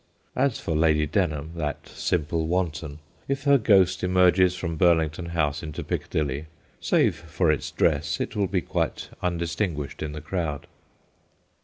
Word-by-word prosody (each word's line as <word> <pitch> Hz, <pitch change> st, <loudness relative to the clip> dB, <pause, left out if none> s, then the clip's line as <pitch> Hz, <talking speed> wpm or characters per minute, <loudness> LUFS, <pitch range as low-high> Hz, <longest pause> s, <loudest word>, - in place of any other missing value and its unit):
As 135 Hz, -2 st, +1 dB
for 80 Hz, -, -2 dB
Lady 75 Hz, -1 st, +3 dB
Denham, 75 Hz, -2 st, -1 dB
that 75 Hz, -2 st, -3 dB
simple 80 Hz, -1 st, -1 dB
wanton, 85 Hz, -4 st, -2 dB, 0.3 s
if 140 Hz, +1 st, -2 dB
her 140 Hz, -2 st, +5 dB
ghost 95 Hz, -5 st, +4 dB
emerges 90 Hz, 0 st, +4 dB
from 85 Hz, -2 st, -3 dB
Burlington 80 Hz, -1 st, +2 dB
House 75 Hz, -4 st, 0 dB
into 75 Hz, -2 st, -6 dB
Piccadilly, 75 Hz, 0 st, -2 dB, 0.3 s
save -, -, +2 dB
for 85 Hz, 0 st, 0 dB
its 75 Hz, -, -2 dB
dress -, -, +1 dB
it -, -, -3 dB
will 100 Hz, -2 st, +1 dB
be 90 Hz, -1 st, 0 dB
quite -, -, -2 dB
undistinguished 85 Hz, -3 st, -2 dB
in 75 Hz, -1 st, -3 dB
the 75 Hz, -, -5 dB
crowd. 80 Hz, -6 st, -3 dB
85 Hz, 145 wpm, -25 LUFS, 75-90 Hz, 0.3 s, her